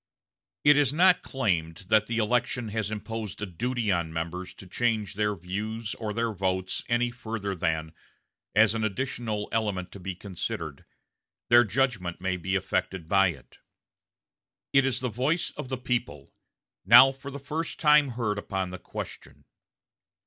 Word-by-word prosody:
It 145 Hz, 0 st, +7 dB
is 145 Hz, -3 st, +4 dB
not 180 Hz, +4 st, +5 dB
claimed 85 Hz, -9 st, -2 dB
that 110 Hz, -1 st, +4 dB
the 115 Hz, -, -2 dB
election 120 Hz, +1 st, 0 dB
has 110 Hz, -1 st, -2 dB
imposed 110 Hz, -1 st, -5 dB
a 105 Hz, -, -2 dB
duty 115 Hz, +4 st, -1 dB
on 85 Hz, -3 st, 0 dB
members 85 Hz, +3 st, -4 dB
to -, -, -11 dB
change 110 Hz, 0 st, -1 dB
their 105 Hz, 0 st, 0 dB
views 105 Hz, +5 st, -4 dB
or 110 Hz, -2 st, -4 dB
their 115 Hz, +1 st, -1 dB
votes 95 Hz, -1 st, -1 dB
any 120 Hz, 0 st, +2 dB
further 110 Hz, -4 st, -4 dB
than, 80 Hz, -2 st, -2 dB, 0.6 s
as 105 Hz, 0 st, +6 dB
an 115 Hz, -1 st, -1 dB
additional 110 Hz, -1 st, -2 dB
element 100 Hz, -5 st, -1 dB
to 100 Hz, -, -10 dB
be 95 Hz, 0 st, -5 dB
considered, 95 Hz, -1 st, -5 dB, 0.6 s
their 120 Hz, 0 st, +8 dB
judgment 110 Hz, -6 st, -1 dB
may 95 Hz, 0 st, -1 dB
be 95 Hz, +2 st, -2 dB
affected 95 Hz, -2 st, -1 dB
by 95 Hz, +1 st, +5 dB
it. 70 Hz, -8 st, -8 dB, 1.1 s
It 135 Hz, -1 st, +5 dB
is 130 Hz, -, 0 dB
the 130 Hz, -, 0 dB
voice 135 Hz, -, 0 dB
of 125 Hz, -, -7 dB
the 130 Hz, -, -2 dB
people, 120 Hz, -, -3 dB, 0.5 s
now 135 Hz, +1 st, +9 dB
for 135 Hz, +1 st, -9 dB
the 140 Hz, -, -6 dB
first 150 Hz, +4 st, -4 dB
time 150 Hz, -2 st, +6 dB
heard 115 Hz, -4 st, -2 dB
upon 95 Hz, -2 st, -3 dB
the 95 Hz, -, -7 dB
question. -, -, -8 dB
105 Hz, 155 wpm, -27 LUFS, 95-120 Hz, 1.1 s, now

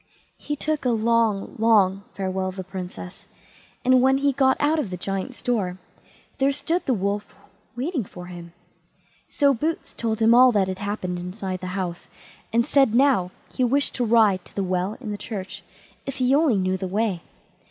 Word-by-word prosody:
He 295 Hz, -, -3 dB
took 310 Hz, +1 st, -2 dB
a 250 Hz, -, +1 dB
long, 230 Hz, -3 st, +1 dB
long 200 Hz, -3 st, +3 dB
farewell 190 Hz, -1 st, -2 dB
of 185 Hz, -, -8 dB
the 190 Hz, -, -5 dB
Princess, 185 Hz, 0 st, -8 dB, 0.6 s
and 255 Hz, 0 st, +5 dB
when 265 Hz, +1 st, +4 dB
he 280 Hz, +1 st, +2 dB
got 265 Hz, -1 st, +3 dB
out 305 Hz, +2 st, +2 dB
of 240 Hz, -, -2 dB
the 180 Hz, -, -5 dB
Giant's 195 Hz, +7 st, -4 dB
door, 205 Hz, -8 st, -1 dB, 0.6 s
there 275 Hz, +1 st, +3 dB
stood 320 Hz, +6 st, -2 dB
the 260 Hz, -, +3 dB
Wolf 200 Hz, +1 st, -3 dB, 0.4 s
waiting 270 Hz, +2 st, -2 dB
for 180 Hz, -2 st, -10 dB
him. 175 Hz, -1 st, -10 dB, 0.8 s
So 280 Hz, -2 st, +3 dB
Boots 315 Hz, +6 st, -3 dB
told 225 Hz, -1 st, -2 dB
him 225 Hz, +1 st, +5 dB
all 250 Hz, +1 st, +7 dB
that 200 Hz, -3 st, +2 dB
had 185 Hz, 0 st, -4 dB
happened 200 Hz, -3 st, -3 dB
inside 185 Hz, +1 st, -5 dB
the 185 Hz, -, -5 dB
house, 175 Hz, -2 st, -4 dB, 0.4 s
and 235 Hz, +1 st, +2 dB
said 270 Hz, -5 st, +3 dB
now 255 Hz, -9 st, +3 dB, 0.2 s
he 255 Hz, -, 0 dB
wished 275 Hz, +4 st, +2 dB
to 250 Hz, -, -1 dB
ride 215 Hz, -5 st, +4 dB
to -, -, -14 dB
the 200 Hz, -, 0 dB
well 185 Hz, +2 st, -1 dB
in 225 Hz, -5 st, -6 dB
the 205 Hz, -, -5 dB
church, 195 Hz, -4 st, -6 dB, 0.5 s
if 275 Hz, -, -4 dB
he 255 Hz, 0 st, +2 dB
only 290 Hz, -4 st, +4 dB
knew 185 Hz, 0 st, 0 dB
the 190 Hz, -, -4 dB
way. 200 Hz, -2 st, -1 dB
220 Hz, 185 wpm, -24 LUFS, 185-260 Hz, 0.8 s, all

